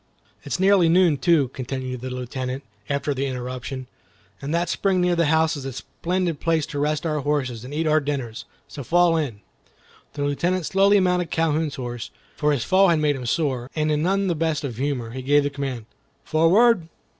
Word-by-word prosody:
"It's 140 +1 -4
nearly 190 -3 +5
noon, 170 -3 +4
too," 160 -7 +3
continued 130 -1 -5
the 130 - -5
Lieutenant, 125 +1 -4 0.3
after 140 +1 -1
the 135 +1 -2
interruption, 130 +1 -5 0.6
"and 140 - -4
that 170 +1 +1
spring 190 +1 +1
near 180 -1 +2
the 170 -2 +2
house 160 +1 +2
is 140 - -6
a 135 -1 -5
splendid 175 +4 -3
place 165 -2 +1
to 145 - -5
rest 150 +1 0
our 155 -2 0
horses 130 -5 -2
and 130 - -9
eat 155 +2 -1
our 155 0 +4
dinners; 135 -6 -4 0.2
so 140 0 -8
fall 175 +4 +3
in." 135 -10 -2 0.7
The 145 - -3
Lieutenant 170 +5 0
slowly 200 +3 +4
mounted 180 -2 +1
Calhoun's 160 -1 0
horse, 120 -3 -5 0.3
for 150 0 +1
his 140 -5 0
fall 195 +1 +4
had 170 -2 +3
made 150 -1 +1
him 125 -2 -6
sore, 130 -4 -1
and 155 -1 +1
in 150 0 +1
none 195 +4 +1
the 180 - +1
best 160 -2 -1
of 125 -6 -5
humor, 130 -4 -2
he 130 +2 -6
gave 145 +2 +3
the 145 - -1
command, 135 -5 -4 0.4
"Forward!" 175 +4 +4
150 Hz, 195 wpm, -23 LUFS, 130-170 Hz, 0.7 s, nearly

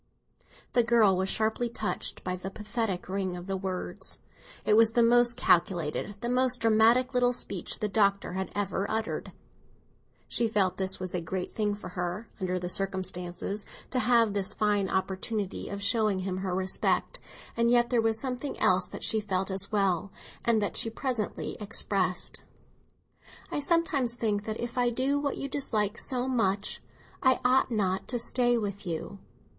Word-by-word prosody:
The 245 - +5
girl 225 -4 +4
was 190 +1 -1
sharply 220 +3 0
touched 220 -2 -3
by 180 0 -2
the 185 +1 -6
pathetic 210 -2 -3
ring 190 -1 -2
of 175 - -8
the 195 0 -2
words; 185 -1 -4 0.5
it 210 - +3
was 225 +1 +5
the 235 - +4
most 240 +1 +4
calculated, 175 0 +1
the 235 - -2
most 250 +1 +2
dramatic 230 +4 +4
little 245 0 +3
speech - - -4
the 215 - -1
Doctor 200 -3 +1
had 190 +1 -3
ever 200 0 -1
uttered. 220 0 -2 1.0
She 235 - 0
felt 200 -4 +1
that 190 0 -1
it - - -10
was 185 -1 -4
a 180 - -1
great 180 +3 -4
thing 210 -2 -1
for 205 -3 -9
her, 180 +4 -4
under 185 -1 -1
the 180 0 -3
circumstances, 190 +1 -2 0.3
to 255 - +1
have 235 -4 +3
this 200 +1 +1
fine 205 -2 +1
opportunity 190 +2 -2
of 200 0 -5
showing 215 -2 +3
him 185 0 -3
her 190 -1 -2
respect; 190 - +1 0.4
and 235 0 +2
yet 240 0 +3
there 240 -2 +3
was 225 0 +2
something 260 +2 -2
else 185 0 +3
that - - -8
she 220 - +4
felt 195 -2 -2
as 195 +2 +1
well, 195 -2 +1 0.3
and 230 -2 +3
that 205 - -1
she 225 - +3
presently 230 -2 -3
expressed. 200 -3 -1 1.1
"I - - -1
sometimes 290 -6 +1
think 210 -3 -1
that 220 0 -4
if 240 +1 -3
I 245 -1 +3
do 265 +4 0
what 285 -1 -2
you 275 - -3
dislike 225 -7 -1
so 255 -1 0
much, 205 -6 0 0.4
I 260 -2 +4
ought 255 +1 +4
not 195 -5 -1
to 245 - 0
stay 240 +1 +3
with 200 -3 -4
you." 170 +4 -4
210 Hz, 170 wpm, -29 LUFS, 190-240 Hz, 1.1 s, The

